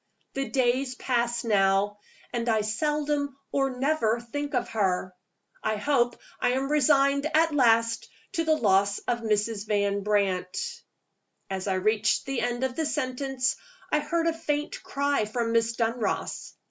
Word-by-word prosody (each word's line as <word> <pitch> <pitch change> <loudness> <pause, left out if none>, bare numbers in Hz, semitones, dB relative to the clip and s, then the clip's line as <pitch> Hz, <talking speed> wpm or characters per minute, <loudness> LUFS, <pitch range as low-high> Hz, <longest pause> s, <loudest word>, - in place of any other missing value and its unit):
"The 270 0 -2
days 255 0 +1
pass 240 -2 0
now, 205 -1 +2 0.3
and 240 0 -1
I 220 -1 +3
seldom 290 +4 -1
or 270 -2 0
never 265 -5 +2
think 290 +4 -4
of 245 - 0
her; 185 -4 0 0.5
I 215 - +1
hope 240 +1 +1 0.2
I 245 - +2
am 270 +2 -1
resigned 280 0 +3
at 325 0 +4
last 230 -4 +3 0.2
to 340 -4 0
the 315 -1 +3
loss 200 -5 +3
of 240 - +1
Mrs. 215 -1 -1
Van 200 -1 +1
Brandt." 205 - -1 0.7
As 190 0 -3
I 190 - +1
reached 215 +3 +1
the 270 -2 -2
end 240 +1 -1
of 260 -1 -1
the 320 -2 0
sentence, 265 -1 -1 0.3
I 300 - +3
heard 330 +3 -1
a 335 - +2
faint 300 -2 -3
cry 280 -5 0
from 230 +2 -2
Miss 230 0 +2
Dunross. 230 -1 -2
245 Hz, 150 wpm, -27 LUFS, 215-285 Hz, 0.7 s, at